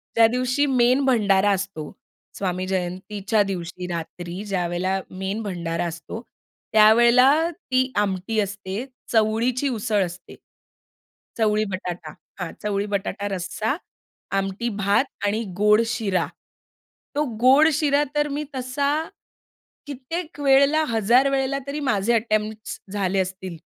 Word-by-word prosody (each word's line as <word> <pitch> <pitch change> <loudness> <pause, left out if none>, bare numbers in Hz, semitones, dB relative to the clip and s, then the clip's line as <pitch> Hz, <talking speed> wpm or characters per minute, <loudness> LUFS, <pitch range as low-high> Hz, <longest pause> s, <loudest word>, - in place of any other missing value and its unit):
ज्या 225 -1 +7
दिवशी 255 +4 +1
मेन 255 0 +3
भंडारा 205 -5 +3
असतो. 190 -6 -3 0.5
स्वामी 185 -1 -2
जयंतीच्या 190 +3 -1
दिवशी 180 -1 -5
रात्री 175 +2 -5
ज्यावेळेला 185 0 -1
मेन 190 +4 -4
भंडारा 170 -3 -3
असतो 170 +7 -7 0.5
त्यावेळेला 235 +4 +7 0.2
ती 260 -6 -1
आमटी 205 +2 0
असते, 200 +3 -3 0.3
चवळीची 230 +4 +2
उसळ 215 -4 0
असते. 175 +2 -10 1.0
चवळी-बटाटा, 210 -5 -1 0.3
हां. 180 - -4
चवळी-बटाटा 200 -1 -2
रस्सा, 205 - -2 0.6
आमटी 195 +5 -2
भात 200 +7 +3 0.2
आणि 215 +3 0
गोड 210 +2 +5
शिरा. 195 -6 0 0.9
तो 300 +1 +1 0.2
गोड 275 +5 +6
शिरा 290 -1 +3
तर 295 0 +1
मी 290 +2 -3
तसा 260 +2 -1 1.0
कित्येक 295 +4 -6
वेळेला 280 +3 +5
हजार 235 +5 +4
वेळेला 275 0 0
तरी 290 +2 -3
माझे 210 +3 +2
अटेम्प्ट्स 215 -1 -1
झाले 195 -1 0
असतील. 185 -2 -4
210 Hz, 110 wpm, -23 LUFS, 190-255 Hz, 1.0 s, ज्या